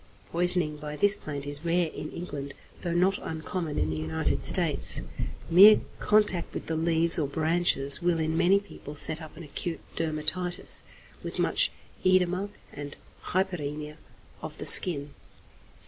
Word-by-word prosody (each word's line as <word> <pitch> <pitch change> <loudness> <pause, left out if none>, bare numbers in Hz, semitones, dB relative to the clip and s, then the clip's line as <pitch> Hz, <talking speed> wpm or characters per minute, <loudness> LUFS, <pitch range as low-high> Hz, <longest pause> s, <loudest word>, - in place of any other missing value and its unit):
Poisoning 175 -3 +1
by 150 0 -8
this 205 +6 +2
plant 145 -2 -8
is 145 +1 -3
rare 170 +1 0
in 155 - -9
England, 140 -5 -8 0.3
though 175 - -4
not 190 +3 +1
uncommon 160 0 -6
in 80 +1 -2
the - - -4
United 80 +1 -3
States. - - +4 0.4
Mere 195 +6 +7 0.2
contact 210 -5 +3
with - - -6
the 160 - -4
leaves 165 +1 0
or 150 - -2
branches 155 -1 +3
will 175 -1 0
in 160 0 -2
many 185 +4 +2
people 175 -7 -13
set 155 +2 +3
up 155 - -13
an 170 - -10
acute 165 +3 -6 0.2
dermatitis, 165 +3 -1 0.4
with - - -8
much - - +1 0.3
oedema 185 +1 0 0.2
and 145 0 -9 0.3
hyperæmia 150 -5 -4 0.4
of - - -9
the - - -8
skin. 145 -6 +6
165 Hz, 145 wpm, -26 LUFS, 150-180 Hz, 0.4 s, Mere